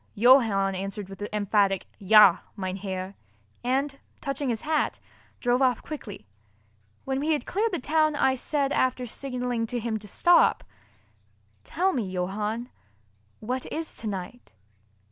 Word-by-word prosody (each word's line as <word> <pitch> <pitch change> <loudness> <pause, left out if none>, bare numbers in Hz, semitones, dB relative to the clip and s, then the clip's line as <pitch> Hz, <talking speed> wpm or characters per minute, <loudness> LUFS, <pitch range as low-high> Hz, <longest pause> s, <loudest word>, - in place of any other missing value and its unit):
Johann 215 -5 +5
answered 195 +1 -5
with 195 0 -10
an 205 - -2
emphatic, 200 -2 +1
"Ja, 205 -2 +7 0.2
mein 185 -2 -3
Herr," 190 -1 -5 0.5
and, 270 +3 0 0.2
touching 275 0 -2
his 225 -2 -1
hat, 310 0 0 0.4
drove 245 +1 +1
off 255 -3 +2
quickly. 225 - -8 0.8
When 270 0 -1
we 310 +3 +1
had 290 -5 -2
cleared 435 +4 0
the 355 - -1
town, 310 +2 +1
I 265 -2 +3
said, 275 +2 -1
after 255 -1 +1
signalling 245 -2 -3
to 245 +2 -3
him 225 -1 -2
to 210 - -12
stop: 345 - +4 1.0
"Tell 380 +2 0
me, 220 -7 -2
Johann, 210 +6 -3 0.7
what 250 +4 -4
is 320 0 -4
tonight?" 210 +2 -6
240 Hz, 140 wpm, -26 LUFS, 200-275 Hz, 1.0 s, Ja